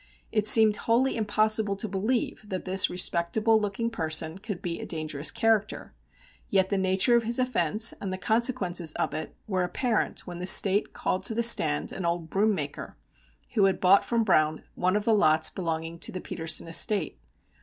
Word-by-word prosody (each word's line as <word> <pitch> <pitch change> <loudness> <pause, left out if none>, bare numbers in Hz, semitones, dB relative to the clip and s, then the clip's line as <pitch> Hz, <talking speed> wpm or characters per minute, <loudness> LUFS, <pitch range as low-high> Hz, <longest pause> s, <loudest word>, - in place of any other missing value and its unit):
It 215 -1 0
seemed 215 -1 +7
wholly 245 +4 0
impossible 215 -1 0
to 210 +3 -3
believe 210 +2 -3
that 185 -2 -5
this 190 0 +2
respectable 185 +5 +1
looking 210 +3 -3
person 160 -3 0
could 205 -3 -7
be 175 -4 -5
a - - -7
dangerous 155 -2 -2
character, 225 -2 -1 0.6
yet 190 -1 +1
the 200 - -1
nature 190 +6 +2
of 235 - +3
his 230 +1 -1
offence 225 -4 +1
and 195 - -5
the 185 - -4
consequences 185 - 0
of - - -3
it 155 +1 -6
were 185 -3 -1
apparent 225 +5 -2
when 175 -1 -8
the 180 - -3
State 200 +2 +5
called 185 - -3
to 220 - -1
the 235 - 0
stand 75 - +3
an 190 - -6
old 170 -1 -3
broom 210 +2 +1
maker, 145 -5 -7 0.6
who 200 - +3
had 195 - 0
bought 195 +2 +4
from 235 -1 -1
Browne 155 -6 +1
one 185 +2 -1
of 210 0 -2
the 225 - +2
lots 160 -6 +2
belonging 165 -2 -5
to - - -1
the 185 - -6
Petersen 160 -2 -2
estate. 165 +1 0
195 Hz, 185 wpm, -26 LUFS, 170-220 Hz, 0.6 s, seemed